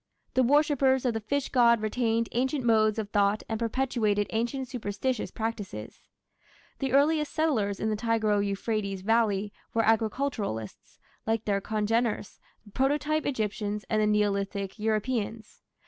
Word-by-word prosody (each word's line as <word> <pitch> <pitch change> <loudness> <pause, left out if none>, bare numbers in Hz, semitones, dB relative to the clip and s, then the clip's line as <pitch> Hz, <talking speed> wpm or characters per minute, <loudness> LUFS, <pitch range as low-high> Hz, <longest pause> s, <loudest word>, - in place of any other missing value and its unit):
The 260 - +3
worshippers 270 -1 +3
of 245 - +2
the 225 - -2
fish 275 +6 -2
god 235 -3 +5
retained 225 +1 0
ancient 260 +2 -1
modes 215 -2 +3
of 210 -2 -4
thought 205 +1 +2
and 225 -1 -3
perpetuated 230 -3 0
ancient 240 +4 -2
superstitious 240 0 -3
practices. 205 - -5 0.8
The 270 -2 -1
earliest 300 +2 +3
settlers 225 -12 0
in 220 - 0
the - - 0
Tigro 215 -2 +1
Euphrates 200 -1 -2
valley 210 -2 +1 0.2
were 225 -1 +3
agriculturists, 220 - -1 0.3
like 225 0 0
their 200 -1 +1
congeners, 220 +1 -1 0.3
the 205 - -15
proto 295 +5 +1
Egyptians 210 -4 -2
and 215 -1 +2
the 210 - +3
Neolithic 200 -1 0
Europeans. 220 0 -2
225 Hz, 135 wpm, -28 LUFS, 210-255 Hz, 0.8 s, god